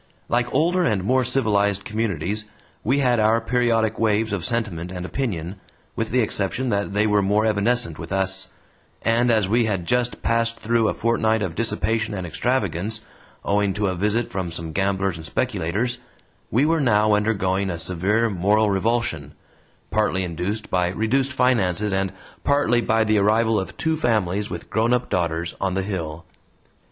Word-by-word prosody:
Like 120 Hz, 0 st, +1 dB
older 175 Hz, +6 st, +2 dB
and 105 Hz, -, +1 dB
more 130 Hz, +5 st, +2 dB
civilized 105 Hz, -6 st, +1 dB
communities, 105 Hz, -3 st, -2 dB, 0.4 s
we 130 Hz, +6 st, +2 dB
had 125 Hz, -4 st, +2 dB
our 110 Hz, +2 st, +4 dB
periodic 115 Hz, -2 st, +1 dB
waves 110 Hz, -1 st, +1 dB
of 95 Hz, -4 st, -2 dB
sentiment 95 Hz, -7 st, -2 dB
and 90 Hz, -1 st, -5 dB
opinion, 95 Hz, -7 st, -3 dB, 0.4 s
with 115 Hz, -1 st, -2 dB
the 125 Hz, +1 st, +2 dB
exception 110 Hz, +4 st, -1 dB
that 100 Hz, -1 st, -1 dB
they 105 Hz, +1 st, +3 dB
were 105 Hz, -1 st, +3 dB
more 105 Hz, +3 st, +2 dB
evanescent 110 Hz, -4 st, +1 dB
with 85 Hz, 0 st, -8 dB
us, 95 Hz, 0 st, -1 dB, 0.5 s
and 115 Hz, +2 st, +2 dB
as 110 Hz, -4 st, +3 dB
we 115 Hz, +3 st, +2 dB
had 95 Hz, -5 st, -1 dB
just 125 Hz, +4 st, 0 dB
passed 115 Hz, 0 st, +1 dB
through 115 Hz, 0 st, +1 dB
a -, -, -1 dB
fortnight 110 Hz, -1 st, +1 dB
of 90 Hz, -4 st, -3 dB
dissipation 110 Hz, +1 st, -1 dB
and 95 Hz, -2 st, -4 dB
extravagance, 105 Hz, +1 st, -1 dB, 0.4 s
owing 100 Hz, -1 st, +1 dB
to 105 Hz, 0 st, 0 dB
a 90 Hz, -, -2 dB
visit 105 Hz, +6 st, 0 dB
from 95 Hz, -2 st, -3 dB
some 80 Hz, -1 st, -5 dB
gamblers 95 Hz, 0 st, 0 dB
and 80 Hz, -, -9 dB
speculators, 110 Hz, +15 st, -1 dB, 0.5 s
we 130 Hz, +6 st, +2 dB
were 165 Hz, 0 st, +2 dB
now 105 Hz, -4 st, +3 dB
undergoing 100 Hz, -2 st, +1 dB
a 85 Hz, -, -3 dB
severe 95 Hz, +7 st, 0 dB
moral 105 Hz, +2 st, +2 dB
revulsion, 95 Hz, -8 st, -1 dB, 0.6 s
partly 105 Hz, -2 st, +1 dB
induced 90 Hz, +5 st, -3 dB
by 90 Hz, -1 st, +2 dB
reduced 115 Hz, +9 st, 0 dB
finances 105 Hz, -7 st, +1 dB
and 95 Hz, -1 st, 0 dB, 0.3 s
partly 140 Hz, -4 st, +2 dB
by 110 Hz, 0 st, +2 dB
the 110 Hz, -1 st, +2 dB
arrival 110 Hz, +2 st, +3 dB
of 95 Hz, -, -6 dB
two 160 Hz, 0 st, 0 dB
families 105 Hz, -, 0 dB
with 85 Hz, -, -6 dB
grownup 120 Hz, +3 st, +1 dB
daughters 85 Hz, -1 st, -1 dB
on 95 Hz, -1 st, 0 dB
the 95 Hz, -, 0 dB
hill. 85 Hz, -4 st, -5 dB
105 Hz, 165 wpm, -23 LUFS, 95-115 Hz, 0.6 s, our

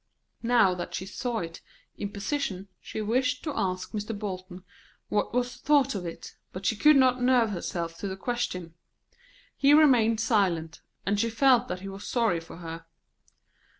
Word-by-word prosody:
Now 230 Hz, -6 st, +4 dB
that 175 Hz, -1 st, -5 dB
she 190 Hz, -, -4 dB
saw 230 Hz, +3 st, -3 dB
it 165 Hz, -1 st, -7 dB, 0.3 s
in 200 Hz, -, -4 dB
position 200 Hz, -3 st, -3 dB
she 220 Hz, -, -6 dB
wished 255 Hz, +5 st, 0 dB
to 300 Hz, -3 st, -3 dB
ask 185 Hz, -1 st, -2 dB
Mr. 210 Hz, 0 st, -4 dB
Bolton 185 Hz, -3 st, -6 dB, 0.5 s
what 210 Hz, -, 0 dB
was 245 Hz, 0 st, -1 dB
thought 280 Hz, -2 st, +3 dB
of 185 Hz, -4 st, -4 dB
it, 165 Hz, -, -8 dB, 0.2 s
but 185 Hz, +1 st, -7 dB
she 220 Hz, -, +2 dB
could 300 Hz, +7 st, +6 dB
not 255 Hz, -2 st, +4 dB
nerve 245 Hz, -3 st, +4 dB
herself 170 Hz, -3 st, -4 dB
to 200 Hz, -, -3 dB
the 190 Hz, 0 st, -5 dB
question. 190 Hz, -7 st, -3 dB, 0.8 s
He 285 Hz, +1 st, +5 dB
remained 240 Hz, -8 st, +5 dB
silent, 185 Hz, -8 st, +1 dB, 0.2 s
and 200 Hz, +1 st, +1 dB
she 230 Hz, -, +1 dB
felt 250 Hz, +1 st, +4 dB
that 180 Hz, 0 st, -4 dB
he 195 Hz, -, -7 dB
was 195 Hz, +1 st, -8 dB
sorry 230 Hz, -8 st, +1 dB
for 165 Hz, 0 st, -11 dB
her. 165 Hz, -1 st, -8 dB
210 Hz, 170 wpm, -27 LUFS, 185-245 Hz, 0.8 s, could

